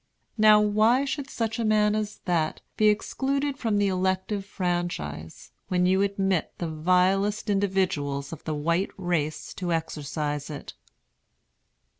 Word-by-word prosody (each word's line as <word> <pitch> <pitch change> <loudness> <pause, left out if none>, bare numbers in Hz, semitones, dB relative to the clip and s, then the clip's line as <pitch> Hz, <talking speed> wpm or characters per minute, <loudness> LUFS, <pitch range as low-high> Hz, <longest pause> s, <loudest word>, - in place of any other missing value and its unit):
Now, 215 0 +7
why 215 +5 +3
should 280 0 -4
such 225 -2 -2
a - - 0
man 210 -1 +3
as 215 -1 -3
that 165 -4 0
be 215 - +3
excluded 275 +6 0
from 225 -5 0
the 205 0 +3
elective 190 +2 -1
franchise, 175 - -3 0.2
when 180 -1 +1
you 190 +1 +3
admit 195 -3 0
the 170 - -3
vilest 185 +6 +2
individuals 185 -8 0
of 160 - -9
the 155 - -2
white 170 +6 0
race 170 -5 -2
to 180 -2 -3
exercise 150 -2 -3
it?" 150 - -7
190 Hz, 135 wpm, -26 LUFS, 165-210 Hz, 0.2 s, Now